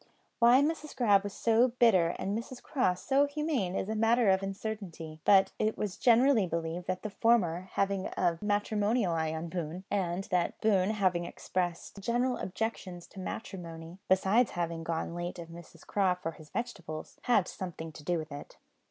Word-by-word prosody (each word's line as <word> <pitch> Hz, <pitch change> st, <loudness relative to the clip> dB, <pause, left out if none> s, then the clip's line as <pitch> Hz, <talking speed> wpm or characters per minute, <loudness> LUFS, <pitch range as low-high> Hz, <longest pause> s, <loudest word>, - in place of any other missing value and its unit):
Why 245 Hz, +3 st, +6 dB
Mrs 305 Hz, 0 st, -2 dB
Grab 205 Hz, -5 st, +4 dB
was 205 Hz, -, -4 dB
so 230 Hz, +2 st, +3 dB
bitter 185 Hz, -9 st, +4 dB
and 200 Hz, +2 st, -2 dB
Mrs 240 Hz, +2 st, -5 dB
Craw 250 Hz, -11 st, +1 dB
so 270 Hz, +10 st, +2 dB
humane 285 Hz, -, -1 dB
is 190 Hz, -, -1 dB
a 220 Hz, -, -2 dB
matter 225 Hz, 0 st, +3 dB
of 190 Hz, 0 st, +2 dB
uncertainty; 195 Hz, -6 st, -6 dB
but 195 Hz, -1 st, +6 dB
it 215 Hz, +1 st, 0 dB
was 205 Hz, -3 st, -3 dB
generally 240 Hz, -3 st, +4 dB
believed 170 Hz, +1 st, -3 dB
that 185 Hz, 0 st, -2 dB
the 215 Hz, -, -4 dB
former 190 Hz, -6 st, +2 dB
having 195 Hz, -1 st, 0 dB
had -, -, -6 dB
a 175 Hz, -2 st, +2 dB
matrimonial 210 Hz, -1 st, +1 dB
eye 160 Hz, -1 st, 0 dB
on 160 Hz, +1 st, -4 dB
Boone, 175 Hz, +1 st, -4 dB
and 185 Hz, -2 st, 0 dB
that 180 Hz, -1 st, 0 dB
Boone 200 Hz, -3 st, +3 dB
having 185 Hz, -5 st, +1 dB
expressed 175 Hz, +2 st, -3 dB
general 240 Hz, +5 st, 0 dB
objections 185 Hz, -3 st, -4 dB
to 195 Hz, -, -11 dB
matrimony 170 Hz, -3 st, -7 dB
besides 195 Hz, +6 st, +4 dB
having 170 Hz, -1 st, -3 dB
gone 165 Hz, 0 st, -2 dB
of -, -, -7 dB
late 175 Hz, +1 st, -4 dB
to 170 Hz, -, -7 dB
Mrs 170 Hz, 0 st, -13 dB
Craw 190 Hz, -3 st, +2 dB
for 180 Hz, -2 st, -4 dB
his 155 Hz, -1 st, -15 dB
vegetables 185 Hz, -7 st, -6 dB
had 235 Hz, -7 st, +3 dB
something 165 Hz, -3 st, -6 dB
to 150 Hz, -, -12 dB
do 175 Hz, +2 st, 0 dB
with 155 Hz, -1 st, -6 dB
it. 145 Hz, 0 st, -9 dB
190 Hz, 180 wpm, -30 LUFS, 170-220 Hz, -, Why